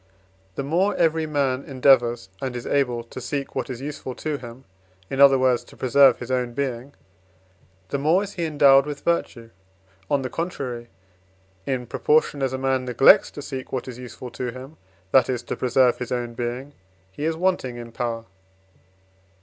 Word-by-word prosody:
The - - -3
more 180 +8 +1
every 160 -1 +1
man 140 -3 0
endeavours, 120 -5 +3
and 130 -2 -3
is 120 - -5
able 125 -4 0
to 120 +2 -9
seek 140 +3 -4
what - - -3
is 125 -1 -6
useful 140 -3 -6
to 155 -2 -3
him 120 +1 -11 0.5
in 135 - 0
other 135 -1 +8
words, 130 -2 +2
to - - -17
preserve 130 0 +5
his 120 +1 -7
own 125 -2 -1
being 135 0 -3 0.9
the 140 - -1
more 160 +7 +3
is 200 0 -7
he 170 -3 -2
endowed 140 -2 +5
with 145 -1 -5
virtue; 120 -9 -1 0.6
on 140 -2 +1
the 130 - -3
contrary, 130 -9 -4 0.8
in 130 -2 -1
proportion 150 +3 +1
as 135 -2 0
a 130 - -2
man 130 -1 0
neglects 125 +2 +6
to 145 - -9
seek 130 -3 -6
what 130 - -3
is 125 -1 -8
useful 125 0 -9
to 125 - -4
him, 130 +5 -10 0.3
that 130 -2 +5
is, 125 -2 -2
to - - -4
preserve 125 0 +2
his 125 - -5
own 120 -1 -2
being, 125 +4 -5 0.4
he 145 - -7
is 160 0 0
wanting 175 -9 0
in 120 -1 -9
power. 115 -1 -3
130 Hz, 180 wpm, -23 LUFS, 125-145 Hz, 0.9 s, other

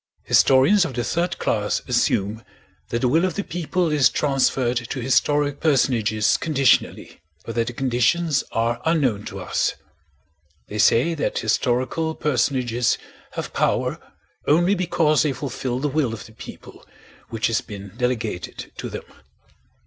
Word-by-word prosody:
Historians 135 +10 +5
of 140 -7 -4
the 120 - -1
third 175 +6 -1
class - - -1
assume 105 +3 0 0.5
that 115 - -2
the 125 - +2
will 160 +7 +3
of 185 -3 0
the 200 - -2
people 175 -1 -1
is 145 -5 +4
transferred 135 -3 +1
to 120 +2 -4
historic 145 +3 +1
personages 115 -8 +2
conditionally, 140 - +1 0.2
but 115 - -5
that 115 0 0
the 120 - -4
conditions 135 +5 +1
are 115 +1 -1
unknown 135 -11 +1
to - - -7
us. - - -1 0.9
They 105 - -6
say 120 +9 +4
that 155 - -2
historical 130 +7 0
personages 125 -4 0 0.4
have - - -5
power - - 0 0.5
only 175 +6 +4
because 165 -5 +2
they 150 -3 +1
fulfill 130 -1 -4
the 140 +3 -1
will 140 -5 0
of 105 - -10
the - - -14
people - - -12 0.5
which 115 -1 -2
has 115 -2 +1
been 100 -3 -10
delegated 120 -6 -3
to - - -5
them. - - -6
130 Hz, 145 wpm, -22 LUFS, 115-155 Hz, 0.9 s, Historians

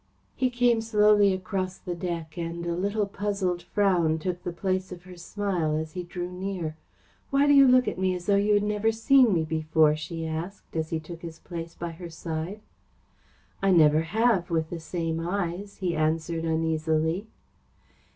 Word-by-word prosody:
He 255 - +1
came 245 -2 +2
slowly 210 -2 +4
across 185 0 -3
the 180 - -5
deck, 170 -3 -5
and 170 0 -4
a 170 - -1
little 200 +4 0
puzzled 200 -3 -2
frown 175 -4 +2
took 180 +2 -3
the 175 - -4
place 185 +2 -2
of 175 -1 -9
her 185 0 -12
smile 175 -3 -2
as 160 0 -4
he 180 - -4
drew 175 0 -6
near. 180 -4 -4 0.5
"Why 275 +1 +3
do 290 - +5
you 275 -1 +8
look 255 0 +5
at - - -2
me 185 -1 +1
as 175 -1 -7
though 200 - +3
you 205 +1 +3
had 205 - +2
never 210 +1 +1
seen 245 +2 +4
me 165 -4 +2
before?" 155 -1 +2
she 165 +1 -5
asked, 165 +5 -6
as 160 -1 -1
he 165 - -1
took 165 +1 -10
his 165 -2 -8
place 170 -1 -7
by 170 -1 -5
her 170 +1 -9
side. 165 +4 -5 1.0
"I 195 - +2
never 155 -4 +5
have, 210 +1 +1
with 160 -2 -1
the 170 - -4
same 165 0 -3
eyes," 180 +2 -3
he 180 -4 -1
answered 160 +1 0
uneasily. 160 +3 0
175 Hz, 180 wpm, -27 LUFS, 165-200 Hz, 1.0 s, you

